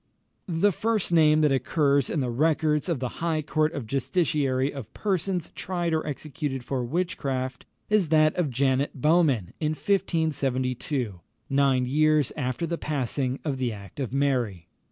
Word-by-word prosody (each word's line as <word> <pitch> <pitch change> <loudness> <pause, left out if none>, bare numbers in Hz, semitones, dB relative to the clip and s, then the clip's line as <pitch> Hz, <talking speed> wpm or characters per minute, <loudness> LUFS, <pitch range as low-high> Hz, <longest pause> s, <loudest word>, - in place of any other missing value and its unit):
The 180 +3 +2
first 215 0 0
name 155 -2 +5
that 150 -2 +4
occurs 140 +1 +2
in 155 - 0
the 125 -2 -1
records 155 +4 +1
of 165 -6 0
the 125 +3 -5
High 160 -2 0
Court 155 +1 +1
of 140 -7 -4
Justiciary 140 - 0
of 135 -6 -8
persons 190 -3 -1
tried 175 -3 -2
or 160 - +1
executed 145 -3 -4
for 130 -2 -2
witchcraft, 135 -4 -2 0.2
is 210 -6 +2
that 155 0 +4
of 175 -5 0
Janet 135 +2 0
Bowman 150 - +2
in 155 -1 0
1572, 140 - -1 0.3
nine 135 -2 +3
years 150 +1 +2
after 130 +2 -2
the 170 0 -3
passing 135 -2 -1
of 140 -4 -2
the 125 -2 0
act 100 +3 -10
of 130 -5 -2
Mary. 125 -11 0
145 Hz, 155 wpm, -26 LUFS, 130-160 Hz, 0.3 s, name